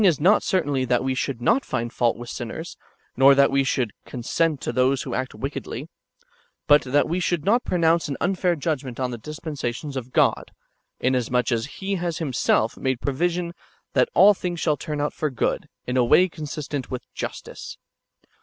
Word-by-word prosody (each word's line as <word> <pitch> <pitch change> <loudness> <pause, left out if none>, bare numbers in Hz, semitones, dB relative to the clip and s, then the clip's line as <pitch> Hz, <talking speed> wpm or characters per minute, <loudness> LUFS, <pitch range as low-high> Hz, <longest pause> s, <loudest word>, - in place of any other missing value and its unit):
479 190 -5 +6
is] 175 +9 +5
not - - +1
certainly 145 -8 0
that 125 -1 +1
we 130 0 0
should 130 -1 -2
not 265 - +3
find 120 -2 -3
fault 120 -2 +1
with 120 0 -8
shiners, 120 +8 -6 0.4
nor 135 +2 +7
that 140 0 +5
we 135 0 +3
sliould 130 -4 0
consent 145 +5 -1
to - - -3
those 130 +2 +2
who - - -5
act 130 0 -3
wickedly; 135 +1 -5 0.8
but 145 0 +6
that 135 +3 +1
we 175 +3 -1
should 175 -3 -1
not 235 +5 +3
pronounce 170 -1 +2
an 140 - -4
unfair 180 -1 +1
judgment 140 -5 -3
on 130 -1 -1
tlie 120 -2 -7
dispensations 150 -2 -5
of 130 -1 -5
God, - - +2 0.5
inasmuch 125 -1 +1
as 115 -1 0
Pie 195 0 -1
has 170 -2 -2
Himself 125 -6 +1
made 130 -2 -1
provision 170 +6 -1 0.4
that 475 - +3
all 205 +2 +8
things 175 -3 -4
shall 155 -2 +2
turn 150 -1 -5
out 145 0 -1
for 155 - -1
good, 130 - -1 0.2
in 125 +1 -1
a 125 - +5
way 180 +10 +5
consistent 150 -4 -5
w^ith 125 - -4
justice. - - -6
140 Hz, 185 wpm, -24 LUFS, 125-170 Hz, 0.8 s, all